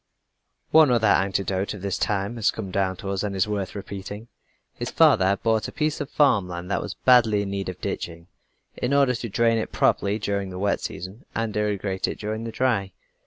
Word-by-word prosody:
One 155 Hz, -2 st, +7 dB
other 120 Hz, -3 st, +3 dB
anecdote 95 Hz, 0 st, +1 dB
of 100 Hz, -, -10 dB
this 100 Hz, -2 st, -2 dB
time 100 Hz, +3 st, -1 dB
has 110 Hz, -, +2 dB
come 100 Hz, -4 st, -4 dB
down 95 Hz, -1 st, 0 dB
to 95 Hz, +2 st, -5 dB
us 95 Hz, -, -1 dB
and 100 Hz, -2 st, -3 dB
is 95 Hz, +1 st, +1 dB
worth 100 Hz, -2 st, -3 dB
repeating. 100 Hz, +3 st, -7 dB, 0.4 s
His -, -, -5 dB
father 95 Hz, -, +5 dB
had 100 Hz, 0 st, 0 dB
bought 110 Hz, -1 st, +1 dB
a -, -, -7 dB
piece 155 Hz, -1 st, -1 dB
of 145 Hz, -, -4 dB
farm 140 Hz, -11 st, +3 dB
land 90 Hz, +1 st, -6 dB
that -, -, 0 dB
was -, -, -6 dB
badly 115 Hz, -5 st, +4 dB
in 100 Hz, -, -5 dB
need 100 Hz, -1 st, -3 dB
of 90 Hz, -, -7 dB
ditching, 85 Hz, -1 st, -5 dB, 0.5 s
in 130 Hz, +3 st, 0 dB
order 140 Hz, -3 st, +4 dB
to 115 Hz, -1 st, -4 dB
drain 115 Hz, +2 st, +2 dB
it -, -, -4 dB
properly 100 Hz, +1 st, +2 dB
during 100 Hz, -2 st, -2 dB
the 90 Hz, -, -7 dB
wet 100 Hz, +2 st, 0 dB
season, 95 Hz, +7 st, -7 dB
and 115 Hz, -2 st, -2 dB
irrigate 105 Hz, -2 st, -1 dB
it -, -, -4 dB
during 110 Hz, +2 st, -4 dB
the 115 Hz, -, -4 dB
dry. 110 Hz, -6 st, 0 dB
100 Hz, 215 wpm, -24 LUFS, 95-115 Hz, 0.5 s, One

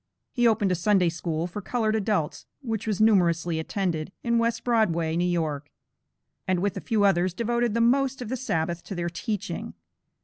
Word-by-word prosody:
He 240 Hz, -2 st, +3 dB
opened 215 Hz, -4 st, +2 dB
a -, -, +3 dB
Sunday 180 Hz, 0 st, +3 dB
school 165 Hz, -1 st, -3 dB
for 180 Hz, +4 st, -6 dB
colored 220 Hz, +1 st, 0 dB
adults, 210 Hz, -7 st, -1 dB, 0.2 s
which 225 Hz, -3 st, -3 dB
was 210 Hz, -4 st, -1 dB
numerously 175 Hz, -6 st, +3 dB
attended, 170 Hz, -1 st, -2 dB
in 235 Hz, -1 st, +2 dB
West 230 Hz, 0 st, 0 dB
Broadway, 170 Hz, -9 st, +1 dB
New 175 Hz, +1 st, +1 dB
York, 155 Hz, -4 st, -2 dB, 0.8 s
and 185 Hz, -1 st, +1 dB
with 200 Hz, +2 st, -1 dB
a -, -, -4 dB
few 215 Hz, -2 st, +1 dB
others, 180 Hz, -2 st, +2 dB
devoted 235 Hz, +1 st, 0 dB
the 230 Hz, -, +2 dB
most 265 Hz, +3 st, +2 dB
of 245 Hz, -, -5 dB
the 260 Hz, -, -1 dB
Sabbath 175 Hz, -9 st, -2 dB
to 195 Hz, -, -6 dB
their 175 Hz, 0 st, -2 dB
teaching. 205 Hz, +3 st, -4 dB
195 Hz, 180 wpm, -26 LUFS, 170-225 Hz, 0.8 s, He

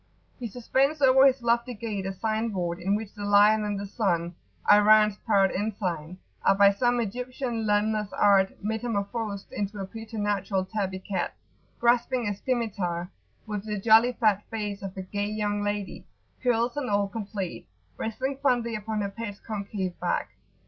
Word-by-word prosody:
He 240 Hz, -, -3 dB
suspends 265 Hz, +6 st, 0 dB
over 265 Hz, 0 st, +7 dB
his 260 Hz, -2 st, +1 dB
lofty 235 Hz, +1 st, +1 dB
gate 205 Hz, -3 st, -4 dB
a -, -, -2 dB
sign 220 Hz, +3 st, -1 dB
board 175 Hz, -4 st, -2 dB
in 195 Hz, +3 st, +1 dB
which 215 Hz, -1 st, -5 dB
the 205 Hz, -, -7 dB
Lion 205 Hz, +1 st, +5 dB
and 205 Hz, -1 st, -2 dB
the 200 Hz, -, -4 dB
Sun 175 Hz, -5 st, -1 dB, 0.3 s
(Iran's 210 Hz, 0 st, +6 dB
proud 200 Hz, -4 st, +2 dB
ensign) 185 Hz, -5 st, -3 dB, 0.3 s
are -, -, +4 dB
by 200 Hz, 0 st, +6 dB
some 245 Hz, +3 st, +1 dB
Egyptian 240 Hz, +1 st, -3 dB
limner's 210 Hz, 0 st, +1 dB
art 195 Hz, -2 st, +4 dB
metamorphosed 215 Hz, -1 st, -3 dB
into 205 Hz, 0 st, -3 dB
a 195 Hz, -, -3 dB
preternatural 205 Hz, -3 st, -2 dB
tabby 190 Hz, -2 st, -3 dB
cat 190 Hz, +1 st, -3 dB, 0.4 s
grasping 240 Hz, 0 st, +2 dB
a 205 Hz, -, 0 dB
scimitar, 195 Hz, -7 st, -2 dB, 0.3 s
with 210 Hz, -2 st, -4 dB
the 210 Hz, -1 st, -3 dB
jolly 225 Hz, +4 st, +5 dB
fat 215 Hz, -4 st, +2 dB
face 210 Hz, -2 st, -4 dB
of 195 Hz, 0 st, -7 dB
a 190 Hz, -, -4 dB
"gay" 205 Hz, +2 st, -3 dB
young 210 Hz, -1 st, -1 dB
lady, 205 Hz, -1 st, -3 dB, 0.3 s
curls 240 Hz, -1 st, +1 dB
and 290 Hz, -5 st, -2 dB
all 200 Hz, -1 st, +2 dB
complete, 200 Hz, -, -5 dB, 0.3 s
resting 260 Hz, +5 st, -3 dB
fondly 240 Hz, -4 st, +1 dB
upon 215 Hz, 0 st, -3 dB
her 200 Hz, -, -1 dB
pet's 205 Hz, 0 st, -7 dB
concave 200 Hz, -4 st, -4 dB
back. -, -, -1 dB
210 Hz, 160 wpm, -27 LUFS, 200-230 Hz, 0.4 s, over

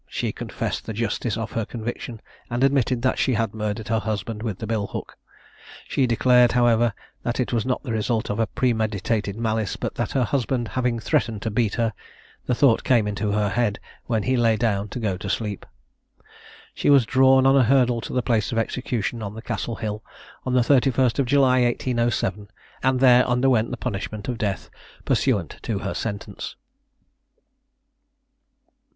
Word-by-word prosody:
She -, -, -2 dB
confessed -, -, -4 dB
the 110 Hz, -, -3 dB
justice 115 Hz, -1 st, -1 dB
of 115 Hz, 0 st, -4 dB
her 115 Hz, -, -1 dB
conviction, 115 Hz, 0 st, -6 dB, 0.3 s
and 120 Hz, +2 st, -1 dB
admitted 130 Hz, -3 st, +2 dB
that 130 Hz, -, +1 dB
she 130 Hz, -, +2 dB
had 110 Hz, -1 st, -1 dB
murdered 105 Hz, 0 st, -3 dB
her 110 Hz, 0 st, +2 dB
husband 110 Hz, +1 st, -3 dB
with 110 Hz, -5 st, -3 dB
the 110 Hz, -, -5 dB
bill 110 Hz, -2 st, -1 dB
hook. -, -, -7 dB, 0.7 s
She 130 Hz, -, +1 dB
declared, 125 Hz, +1 st, +4 dB
however, 120 Hz, -2 st, +3 dB, 0.3 s
that 120 Hz, +1 st, -2 dB
it 125 Hz, -, -1 dB
was 115 Hz, +1 st, 0 dB
not 130 Hz, -, -1 dB
the 125 Hz, -, -4 dB
result 110 Hz, +1 st, -1 dB
of 110 Hz, +1 st, -2 dB
premeditated 110 Hz, -4 st, 0 dB
malice, 110 Hz, -3 st, -1 dB
but -, -, -4 dB
that -, -, -3 dB
her 130 Hz, -, +2 dB
husband 120 Hz, 0 st, -1 dB
having 125 Hz, -2 st, 0 dB
threatened 110 Hz, -1 st, 0 dB
to 110 Hz, -, -2 dB
beat 110 Hz, -1 st, 0 dB
her, 115 Hz, -2 st, 0 dB, 0.5 s
the 125 Hz, -, +2 dB
thought 120 Hz, -3 st, +4 dB
came 115 Hz, -5 st, +3 dB
into 105 Hz, 0 st, -2 dB
her 105 Hz, -1 st, +1 dB
head 105 Hz, 0 st, 0 dB, 0.3 s
when 110 Hz, -4 st, 0 dB
he 130 Hz, -, +1 dB
lay 115 Hz, -2 st, +3 dB
down 105 Hz, -3 st, 0 dB
to 125 Hz, -, -5 dB
go 100 Hz, -5 st, -1 dB
to 100 Hz, -, -6 dB
sleep. 105 Hz, -1 st, -3 dB, 1.1 s
She -, -, 0 dB
was 140 Hz, -4 st, +6 dB
drawn 130 Hz, +2 st, +5 dB
on 135 Hz, +1 st, +5 dB
a 135 Hz, -, +6 dB
hurdle 125 Hz, -1 st, +3 dB
to -, -, -7 dB
the 125 Hz, -, 0 dB
place 115 Hz, -4 st, +1 dB
of 115 Hz, -, -2 dB
execution 115 Hz, 0 st, -2 dB
on 100 Hz, 0 st, -5 dB
the 110 Hz, -, -7 dB
Castle 115 Hz, -, -3 dB
hill, 105 Hz, -1 st, -4 dB, 0.4 s
on 130 Hz, -, 0 dB
the 125 Hz, -, +5 dB
31st 130 Hz, -1 st, +3 dB
of 135 Hz, -, +2 dB
July 130 Hz, -1 st, +4 dB
1807, 120 Hz, -5 st, 0 dB, 0.3 s
and 130 Hz, 0 st, +2 dB
there 125 Hz, -1 st, +6 dB
underwent 125 Hz, -2 st, +2 dB
the 125 Hz, -, -4 dB
punishment 105 Hz, -2 st, -4 dB
of 125 Hz, -2 st, -3 dB
death 100 Hz, -3 st, -3 dB, 0.3 s
pursuant -, -, 0 dB
to -, -, -2 dB
her -, -, -2 dB
sentence. 100 Hz, -3 st, -5 dB
115 Hz, 180 wpm, -23 LUFS, 110-125 Hz, 1.1 s, was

